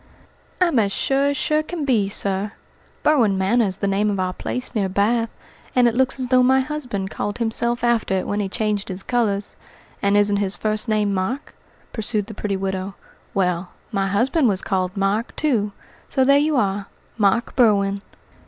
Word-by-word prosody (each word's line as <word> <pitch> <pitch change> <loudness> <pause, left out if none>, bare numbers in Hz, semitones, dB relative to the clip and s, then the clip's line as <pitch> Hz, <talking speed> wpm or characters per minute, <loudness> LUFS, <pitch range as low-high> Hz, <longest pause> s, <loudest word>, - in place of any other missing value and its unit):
"I'm 340 -9 +3
as 200 -2 +1
sure 270 +6 +1
as 285 0 +1
sure 305 +2 +1
can 315 -1 -4
be, 220 -7 +2
sir. 200 +1 -2 0.5
Berwin 235 -10 +3
Manor 215 +5 +2
is 190 -1 -2
the 200 - -1
name 200 +2 +1
of 200 -2 -1
our 185 0 -1
place 250 +6 -4
near 200 -5 0
Bath, 225 +4 +1 0.4
and 250 -1 +5
it 235 - +2
looks 260 +2 +1
as 255 -1 -2
though 255 -1 +5
my 260 +1 +4
husband 250 -9 -3
called 205 - -3
himself 235 +1 -1
after 235 -5 +2
it 185 - -1
when 205 - -2
he 200 -2 -1
changed 210 0 -1
his 190 +1 -5
colours. 210 -5 -1 0.5
And 200 +1 +3
isn't 205 0 +3
his 200 -1 0
first 215 +1 0
name 210 -2 +1
Mark?" 195 +10 -3 0.4
pursued 215 -2 0
the 220 - -9
pretty 200 -1 -2
widow. 190 0 -3 0.4
"Well, 180 -2 0 0.2
my 195 0 0
husband 250 - +2
was 195 -4 0
called 185 0 -1
Mark, 200 +4 0
too, 225 -9 0 0.4
so 265 - +2
there 280 +1 +6
you 300 +1 +1
are 200 -4 0 0.3
Mark 205 +4 +2
Berwin." 200 -4 +3
210 Hz, 185 wpm, -22 LUFS, 195-245 Hz, 0.5 s, there